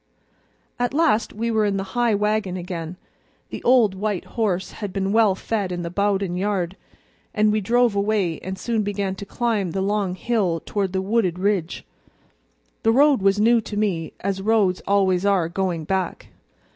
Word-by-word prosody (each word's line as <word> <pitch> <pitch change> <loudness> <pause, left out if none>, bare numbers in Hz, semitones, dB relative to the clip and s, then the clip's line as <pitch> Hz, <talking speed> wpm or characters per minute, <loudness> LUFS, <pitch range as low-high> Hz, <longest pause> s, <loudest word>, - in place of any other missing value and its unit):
At 245 +2 -1
last 305 -9 +2
we 230 +2 -2
were 220 -1 +2
in 200 -1 0
the 195 - -2
high 240 -3 +2
wagon 210 -2 0
again; 175 -1 -6 0.5
the - - -6
old 240 -5 +4
white 200 -1 -3
horse 195 -6 -2
had 205 -3 -6
been 195 +1 -1
well 215 -3 +4
fed 200 -2 -2
in 175 -1 -3
the 170 - -5
Bowden 195 -2 0
barn, 195 -4 -1 0.6
and 210 -1 +3
we 215 0 +1
drove 240 +3 +2
away 200 -5 0
and 190 0 -6
soon 230 0 -1
began 200 -2 -2
to 195 +1 -9
climb 220 -5 -1
the 190 +3 -2
long 200 -2 0
hill 190 -6 0
toward 195 -3 -2
the 190 0 -1
wooded 195 -4 +1
ridge. 190 -3 -1 1.0
The 225 - +3
road 275 -1 +4
was 195 +1 +3
new 230 +2 +4
to 210 -1 -6
me, 185 -7 -1
as 195 0 -2
roads 205 -3 +2
always 190 -2 +2
are, 195 -5 +2
going 175 -2 -2
back. 185 +2 -3
200 Hz, 175 wpm, -22 LUFS, 185-215 Hz, 1.0 s, old